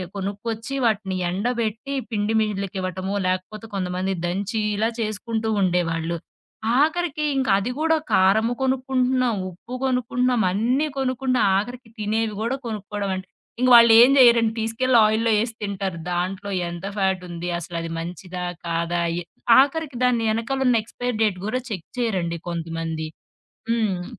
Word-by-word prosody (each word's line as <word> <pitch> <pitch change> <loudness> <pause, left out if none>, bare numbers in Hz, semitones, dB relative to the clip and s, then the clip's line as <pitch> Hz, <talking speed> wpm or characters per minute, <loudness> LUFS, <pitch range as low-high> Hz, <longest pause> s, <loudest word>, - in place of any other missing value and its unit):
కొనుక్కొచ్చి 215 +5 -4
వాటిని 200 -4 0
ఎండబెట్టి, 230 +5 -2 0.2
పిండి 215 +1 0
మిళ్ళుకి 200 -3 -2
ఇవ్వటమో, 185 +2 -3
లేకపోతే 185 +4 -3
కొంతమంది 185 0 -1
దంచి 200 +5 -2 0.2
ఇలా 220 +2 +1
చేసుకుంటూ 220 +1 -2
ఉండేవాళ్ళు. 170 -2 0 0.6
ఆఖరికి 315 -1 +1
ఇంక 265 -3 0
అది 220 +5 -2
కూడా 320 +1 +2 0.2
కారము 215 +5 +4
కొనుక్కుంటున్నాం, 255 -2 +1
ఉప్పు 230 +8 -12
కొనుక్కుంటున్నాం, 250 -1 +1
అన్నీ 245 +10 +1
కొనుక్కుంటున్నాం. 260 -1 +1
ఆఖరికి 245 +3 -7
తినేవి 215 +1 0
గూడా 240 +4 -1
కొనుక్కోవడం 205 -2 -4
అంటే, 185 0 -7 0.3
ఇంక 255 0 +3
వాళ్ళేం 235 +2 +8
చేయరండి. 235 -3 +6
తీసుకెళ్ళి 230 +3 +2
ఆయిల్‌లో 220 +2 +2
ఏసి 230 0 -2
తింటారు. 195 -4 -3
దాంట్లో 190 +3 -2 0.2
ఎంత 175 +2 -7
ఫ్యాటుంది? 180 -3 -1
అసలది 165 0 -5
మంచిదా? 180 +1 -6 0.2
కాదా? 170 +1 -1
అయ 170 +1 -2 0.4
ఆఖరికి 285 -1 +1
దాన్ని 240 -2 +2
ఎనకాలున్న 245 +1 +1
ఎక్స్‌పైర్ 245 0 -4
డేట్ 200 -4 0
గూడా 255 +3 -1
చెక్ 185 -5 -5
చేయరండి 180 -8 -1
కొంతమంది. 165 -1 -3 0.6
హ్మ్. 210 -6 0
215 Hz, 125 wpm, -23 LUFS, 185-245 Hz, 0.6 s, వాళ్ళేం